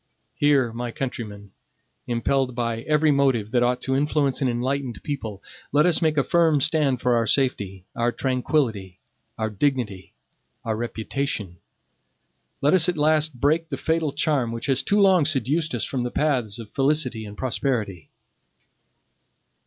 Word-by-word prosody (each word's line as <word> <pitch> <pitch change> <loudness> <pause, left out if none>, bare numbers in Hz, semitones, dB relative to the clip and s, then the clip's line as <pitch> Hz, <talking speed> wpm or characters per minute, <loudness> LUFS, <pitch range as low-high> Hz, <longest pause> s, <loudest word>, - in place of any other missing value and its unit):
Here, 140 -5 +2
my 120 +1 -4
countrymen, 110 -6 -6 0.6
impelled 125 +2 0
by 115 -2 -2
every 150 +3 +2
motive 135 -7 +1
that 120 - +2
ought 125 +1 +1
to 130 - -1
influence 145 -1 +1
an 130 - +2
enlightened 125 +1 -2
people, 110 -9 -5 0.3
let 150 +2 +4
us 175 -2 +3
make 155 -2 +1
a 140 - +4
firm 165 -2 +3
stand 145 -3 +1
for 125 -1 +2
our 115 -1 +1
safety, 100 -8 0
our 120 +1 +1
tranquillity, 125 - -1 0.4
our 110 -1 -2
dignity, 105 -4 -2 0.5
our 110 -1 -1
reputation. 115 -4 -3 1.0
Let 145 - +3
us 180 -1 +4
at 175 - -2
last 155 -2 +2
break 160 +4 +1
the - - -3
fatal 160 -2 0
charm 145 -5 0
which 115 0 -4
has 135 -2 +1
too 205 - +1
long 190 -4 +5
seduced 150 +1 0
us 120 - -1
from 130 - -3
the 120 - -2
paths 125 -8 0
of 115 -3 -10
felicity 135 -5 0
and 105 -1 -10
prosperity. 115 - -2
130 Hz, 155 wpm, -24 LUFS, 115-150 Hz, 1.0 s, long